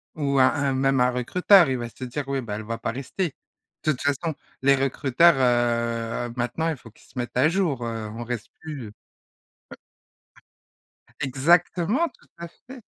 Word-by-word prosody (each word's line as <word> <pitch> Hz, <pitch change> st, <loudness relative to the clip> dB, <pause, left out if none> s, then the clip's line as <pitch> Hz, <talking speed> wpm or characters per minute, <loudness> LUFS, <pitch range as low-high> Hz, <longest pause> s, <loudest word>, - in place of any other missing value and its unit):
Ou 140 Hz, -3 st, 0 dB
un 130 Hz, -, +7 dB
un 140 Hz, -2 st, 0 dB
même 135 Hz, 0 st, +2 dB
un 125 Hz, 0 st, +4 dB
recruteur, 175 Hz, -, +4 dB
il 130 Hz, -, 0 dB
va 120 Hz, -1 st, -4 dB
se 130 Hz, -, -11 dB
dire: 135 Hz, +3 st, -4 dB
«Oui, 135 Hz, -1 st, -1 dB
bah 110 Hz, -4 st, -5 dB
elle 110 Hz, -, -5 dB
va 115 Hz, +2 st, -4 dB
pas 115 Hz, -, -3 dB
rester». 135 Hz, -, -3 dB, 0.5 s
De 155 Hz, -, +3 dB
toute 130 Hz, -, -5 dB
façon, 145 Hz, +3 st, -1 dB, 0.3 s
les 140 Hz, +1 st, +5 dB
recruteurs, 135 Hz, +4 st, +3 dB, 0.9 s
heu, -, -, -9 dB
maintenant, 125 Hz, +6 st, -1 dB
il 160 Hz, -, -1 dB
faut 120 Hz, -, -14 dB
qu'ils -, -, -22 dB
se -, -, -18 dB
mettent 120 Hz, 0 st, -3 dB
à 130 Hz, +4 st, +5 dB
jour, 160 Hz, -8 st, 0 dB
heu, 115 Hz, -2 st, -4 dB
on 120 Hz, -, -5 dB
reste 120 Hz, -2 st, -5 dB
plus. 140 Hz, -9 st, -7 dB, 2.3 s
Exactement, 175 Hz, -, +2 dB
tout -, -, -25 dB
à 170 Hz, 0 st, -7 dB, 0.2 s
fait. 255 Hz, -1 st, -10 dB
135 Hz, 175 wpm, -24 LUFS, 125-160 Hz, 2.3 s, un